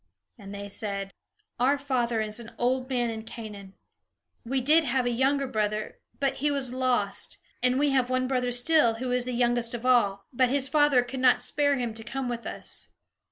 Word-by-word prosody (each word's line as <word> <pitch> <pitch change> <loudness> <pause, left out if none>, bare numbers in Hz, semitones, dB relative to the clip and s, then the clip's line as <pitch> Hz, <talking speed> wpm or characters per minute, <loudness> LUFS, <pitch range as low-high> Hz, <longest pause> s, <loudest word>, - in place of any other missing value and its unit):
And 200 -1 -10
they 200 0 -6
said: 200 -1 -4 0.5
"Our 270 +4 +3
father 245 -5 -1
is 215 +1 -3
an 230 -1 -10
old 255 +1 0
man 245 -3 0
in 220 -1 -5
Canaan. 210 -4 -9 0.7
We 265 +3 -1
did 305 +6 +4
have 260 -2 0
a 245 - +1
younger 275 +3 +1
brother, 215 -3 -2 0.2
but 275 -1 0
he 295 +2 +1
was 275 -3 0
lost; 250 -6 -1 0.2
and 250 +1 +2
we 290 0 +2
have 260 -2 +2
one 255 0 0
brother 250 -1 0
still, 245 -1 +3
who 250 +2 -4
is 250 0 +2
the 250 - -3
youngest 240 -1 +1
of 240 +1 -7
all, 200 -6 +3
but 250 0 +3
his 275 0 +2
father 290 -3 +4
could 260 +2 -6
not 255 -1 +5
spare 285 +3 +1
him 240 -3 -2
to 225 0 -6
come 270 +2 -4
with 235 -1 -4
us." - - -4
250 Hz, 200 wpm, -27 LUFS, 225-265 Hz, 0.7 s, not